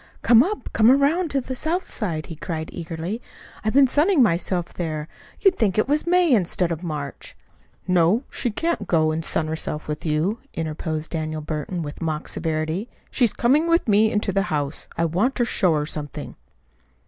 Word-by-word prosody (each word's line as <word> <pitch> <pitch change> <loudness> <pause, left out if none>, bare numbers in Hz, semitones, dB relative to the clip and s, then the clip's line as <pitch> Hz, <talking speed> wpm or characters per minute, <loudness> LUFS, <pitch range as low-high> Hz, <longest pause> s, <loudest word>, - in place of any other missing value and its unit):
"Come 235 -1 +7
up. 410 +9 -2
Come 220 +1 +5
around 285 +4 +3
on 270 - +1
the 260 - -3
south 325 +8 -2
side," 165 -8 -3
he 165 - -8
cried 160 0 -5
eagerly. 170 +6 -5 0.4
"I've 215 - 0
been 280 -1 +8
sunning 295 +3 +4
myself 175 -3 0
there. 155 -3 -3 0.3
You'd 390 -2 +3
think 205 -5 +2
it 215 - +3
was 300 +4 +1
May 355 -4 +4
instead 180 -4 +1
of 165 -1 -3
March." 150 -5 -6 0.5
"No, 180 +6 +3
she 245 - -1
can't 325 - -1
go 155 -2 +3
and 160 +1 -2
sun 160 - 0
herself 155 -1 -4
with 150 0 -4
you," 165 +8 0 0.2
interposed 155 0 -3
Daniel 155 -1 -3
Burton 155 +3 -4
with 145 +2 -8
mock 155 -2 -2
severity. 160 +6 -2 0.2
"She's 240 -5 +3
coming 285 +7 +2
with 335 -4 +3
me 215 +1 +4
into 210 -1 0
the 195 +1 0
house. 145 -1 -2
I 170 - +2
want 195 +12 +1
to 240 - +2
show 180 -7 +2
her 150 0 0
something." 150 -2 -6
180 Hz, 185 wpm, -23 LUFS, 155-245 Hz, 0.5 s, been